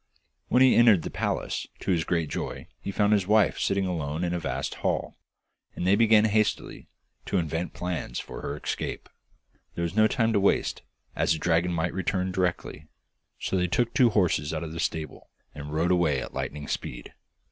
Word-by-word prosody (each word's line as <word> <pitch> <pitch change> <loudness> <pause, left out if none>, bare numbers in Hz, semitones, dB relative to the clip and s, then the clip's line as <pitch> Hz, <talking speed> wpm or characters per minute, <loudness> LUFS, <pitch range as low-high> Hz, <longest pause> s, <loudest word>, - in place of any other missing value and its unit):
When 125 - +4
he 130 - +6
entered 110 -8 +6
the - - -5
palace, - - -2
to - - -1
his 85 -3 +2
great 85 -3 0
joy - - -5
he - - -6
found 105 +1 +2
his 100 -3 +1
wife 105 0 +3
sitting 100 0 +1
alone 80 -2 -2
in 90 0 -1
a 90 - -1
vast 80 - -3
hall, - - -1 0.6
and - - -3
they 95 +2 +5
began 110 -1 +5
hastily 110 0 0 0.4
to 100 - 0
invent 80 0 -2
plans 90 -8 -4
for - - -8
her 70 - -4
escape. - - -4 0.7
There 85 - -2
was 85 +2 -3
no 110 0 +5
time 115 -1 +1
to 105 - +3
waste, 100 - +1 0.3
as - - +2
the - - -2
dragon 85 +3 +1
might 85 +1 -1
return 95 0 -1
directly, 90 -4 -2 0.5
so - - -3
they 90 -1 +1
took 120 +6 0
two 125 -2 +5
horses 85 -7 +1
out 80 - -3
of 80 - -6
the 80 - -6
stable, 80 -2 -4 0.2
and 75 0 -8
rode 80 +4 +1
away 85 -6 +2
at - - -7
lightning 75 0 -4
speed. - - -5
90 Hz, 190 wpm, -27 LUFS, 80-100 Hz, 0.7 s, he